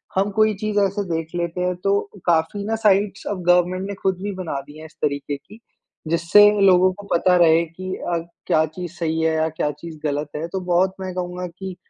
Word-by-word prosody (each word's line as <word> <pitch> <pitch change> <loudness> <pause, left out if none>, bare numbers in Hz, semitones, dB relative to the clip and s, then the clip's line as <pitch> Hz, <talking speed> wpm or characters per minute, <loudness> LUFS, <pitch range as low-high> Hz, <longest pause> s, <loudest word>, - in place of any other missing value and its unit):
हम 195 +2 +1
कोई 215 0 +4
चीज़ 210 -1 +1
ऐसे 200 +1 +1
देख 160 0 -4
लेते 170 +1 -2
हैं 180 0 0
तो 200 0 +3 0.3
काफ़ी 170 +4 +1
ना 220 +1 0
साइट्स 200 0 +2
अब 185 -3 -4
गवर्नमेंट 180 +2 +3
ने - - -3
ख़ुद 190 -1 +1
भी 205 - -2
बना 175 -7 -4
दी 150 +1 -12
है 160 - -10
इस 160 - -15
तरीके 145 -1 -1
की। 210 +10 -16 0.5
जिससे 170 +5 +5 0.2
लोगों 185 -1 +5
को 205 +2 -12
पता 180 +2 +3
रहे 165 -1 +5
कि 185 +3 -7
अ, 175 -1 -2 0.3
क्या 155 0 +3
चीज़ 170 +2 -7
सही 160 -1 -1
है 160 0 +2
या 160 0 +1
क्या 150 -1 -2
चीज़ 155 +2 -10
ग़लत 145 0 -1
है। 155 +2 -3
तो 190 - -3
बहुत 185 +2 +3
मैं 185 -1 -4
कहूँगा 180 0 -4
कि 185 +2 -8
180 Hz, 215 wpm, -22 LUFS, 160-190 Hz, 0.5 s, जिससे